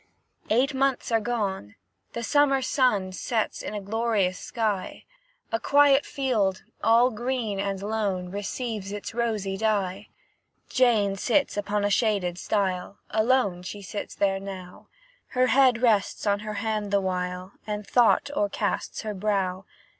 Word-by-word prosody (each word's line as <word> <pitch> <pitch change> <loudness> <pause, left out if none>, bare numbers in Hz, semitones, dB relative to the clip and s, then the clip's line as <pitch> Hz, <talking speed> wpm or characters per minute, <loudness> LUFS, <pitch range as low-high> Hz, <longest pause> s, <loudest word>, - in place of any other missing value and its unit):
Eight 260 +6 +2
months 270 -2 0
are 225 - +4
gone, 205 - -3 0.4
the 235 - -4
summer 275 0 +3
sun 225 -9 +2
Sets 220 +3 -2
in - - -5
a - - -2
glorious 205 -3 0
sky; 215 -5 -3 0.5
A 225 - 0
quiet 285 +1 +4
field, 215 -9 0 0.2
all 235 +3 +5
green 235 -3 -2
and 195 -1 -2
lone, 200 -4 -2
Receives 205 0 -4
its 205 +1 -6
rosy 215 -5 -1
dye. 205 -2 -1 0.6
Jane 220 -6 +3
sits 275 +7 +1
upon 205 0 -1
a 205 - +1
shaded 195 -6 +1
stile, 190 -2 -1
Alone 220 -5 +2
she 200 +3 -7
sits 200 +2 -6
there 195 -1 +1
now; 190 -2 -9 0.4
Her 255 0 +2
head 255 -2 +4
rests 215 -4 +2
on 200 -1 +2
her 210 0 -5
hand 215 0 -2
the 200 0 +3
while, 180 0 -3 0.2
And 210 -1 -3
thought 245 +5 +3
o'ercasts 305 -5 -1
her 215 -1 -3
brow. 195 -2 -1
210 Hz, 140 wpm, -26 LUFS, 195-240 Hz, 0.6 s, all